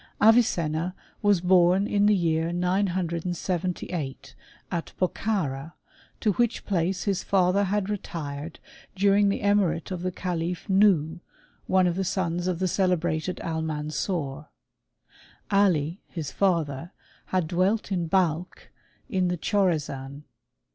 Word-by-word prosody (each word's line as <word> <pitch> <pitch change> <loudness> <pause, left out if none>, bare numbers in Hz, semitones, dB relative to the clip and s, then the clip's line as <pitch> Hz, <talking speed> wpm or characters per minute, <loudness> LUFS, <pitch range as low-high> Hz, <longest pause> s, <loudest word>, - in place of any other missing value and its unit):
Avicenna 180 -7 +3 0.3
was 205 -4 +3
born 180 +1 +4
in 205 0 +2
the 210 - +5
year 165 -2 +1
978, 175 -3 -2 0.4
at 170 -3 -3
Bokhara, 170 -6 -1 0.5
to 215 - +2
which 240 +3 0
place 185 -1 0
his 195 -3 -1
father 195 +1 +2
had 200 0 0
retired 160 -6 -5 0.4
during 200 +1 +4
the 200 - -1
emirate 195 -5 +1
of 180 -2 -3
the 185 0 -1
calif 175 0 -3
Nuhh, 185 -5 +3 0.5
one 185 -1 +4
of 175 -1 +1
the 190 - -1
sons 175 -1 -1
of 180 -2 0
the 185 +2 0
celebrated 175 -2 0
Almansor. 155 -2 -3 1.0
Ali, 180 -4 +2
his 160 -5 -5
father, 165 -4 0 0.3
had 185 -4 0
dwelt 190 +5 0
in 175 -3 0
Balkh, 175 -1 -1 0.4
in 190 -7 0
the 180 0 -1
Chorazan. 150 -7 -1
180 Hz, 120 wpm, -26 LUFS, 165-195 Hz, 1.0 s, the